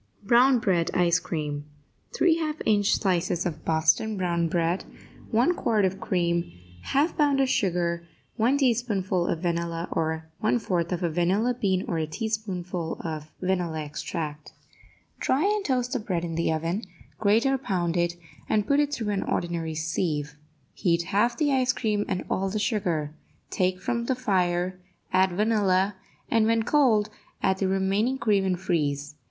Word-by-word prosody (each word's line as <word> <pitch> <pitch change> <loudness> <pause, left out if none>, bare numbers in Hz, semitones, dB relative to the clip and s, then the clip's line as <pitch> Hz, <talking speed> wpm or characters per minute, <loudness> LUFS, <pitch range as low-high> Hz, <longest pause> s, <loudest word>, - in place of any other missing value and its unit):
BROWN 245 +5 +5
BREAD 180 -7 +1
ICE 175 -1 +3
CREAM 150 -3 -4 0.5
3 335 -2 +4
half 310 -2 -2
inch 205 -2 +3
slices 175 -2 0
of 160 -3 -4
Boston 160 +7 +2
Brown 170 -2 0
Bread 170 +2 0 0.5
1 245 +10 +3
quart 220 - +1
of 190 +1 -1
cream 170 -2 0 0.3
1/2 290 +5 +1
pound 285 -2 +3
of 270 - +3
sugar 170 -6 0 0.3
1 245 +4 +2
teaspoonful 210 -9 +1
of 165 - -1
vanilla 170 -1 -1
or 160 0 -1 0.2
1/4 190 -6 0
of 180 0 -2
a 170 - +2
vanilla 190 +9 +1
bean 190 -6 0
or 165 - -1
a 155 - -1
teaspoonful 180 -3 -3
of 155 -2 -5
vanilla 180 -4 -1
extract 150 0 -5 0.7
Dry 270 +4 +1
and 415 0 +1
toast 250 -4 0
the 255 - 0
bread 180 -6 -2
in 165 - -4
the 165 0 0
oven, 165 +6 -1 0.4
grate 220 +3 +3
or 270 0 +2
pound 175 -8 -1
it, 175 0 +1 0.3
and 210 -1 +2
put 280 +5 +3
it 290 -1 +2
through 220 -7 -2
an 195 - 0
ordinary 170 -2 -2
sieve. 155 -2 -2 0.4
Heat 170 -2 +1
half 235 +4 +2
the 270 -4 +2
cream 210 -3 0
and 185 -2 -2
all 195 +1 0
the 210 - -2
sugar; 185 -9 -1 0.4
take 185 0 0
from 235 +4 -2
the 260 - 0
fire, 185 -6 0 0.3
add 185 0 +3
vanilla, 200 -1 +2 0.3
and, 225 -1 +3
when 225 0 +2
cold, 225 -7 +3 0.3
add 190 0 +2
the 195 - +1
remaining 195 +7 +1
cream, 205 -6 +2
and 185 -2 0
freeze. 150 -5 -1
190 Hz, 160 wpm, -26 LUFS, 170-225 Hz, 0.7 s, BROWN